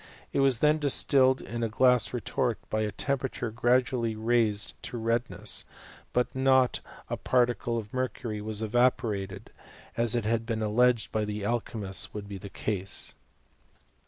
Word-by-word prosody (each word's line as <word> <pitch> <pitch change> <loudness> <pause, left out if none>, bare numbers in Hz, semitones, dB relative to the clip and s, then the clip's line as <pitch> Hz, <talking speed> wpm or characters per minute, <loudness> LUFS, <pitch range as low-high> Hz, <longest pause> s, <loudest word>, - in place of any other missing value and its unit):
It - - +1
was 135 -3 +4
then 150 +1 +4
dis 140 -2 +4
tilled 130 -2 +3
in 120 0 -6
a 115 - 0
glass 125 0 +3
retort, 125 0 -1
by 110 - 0
a 105 -1 -1
temperature 135 -3 -3
gradually 120 0 +1
raised 110 -2 +1
to 125 - -6
redness, 115 -3 +1 0.5
but 125 0 0
not 130 -1 +3 0.3
a - - -2
particle 120 -1 +1
of 105 -2 -6
mercury 125 -4 -3
was 110 0 -2
evaporated, 110 -4 0 0.4
as 115 0 +2
it 120 -3 -1
had 115 +1 0
been 110 -2 -2
alleged 120 +2 +2
by 110 - 0
the 105 -1 -4
alchymists 105 -5 0
would 105 -1 -6
be 100 -1 -7
the 100 - -9
case. 95 -2 -1
115 Hz, 155 wpm, -28 LUFS, 105-125 Hz, 0.5 s, was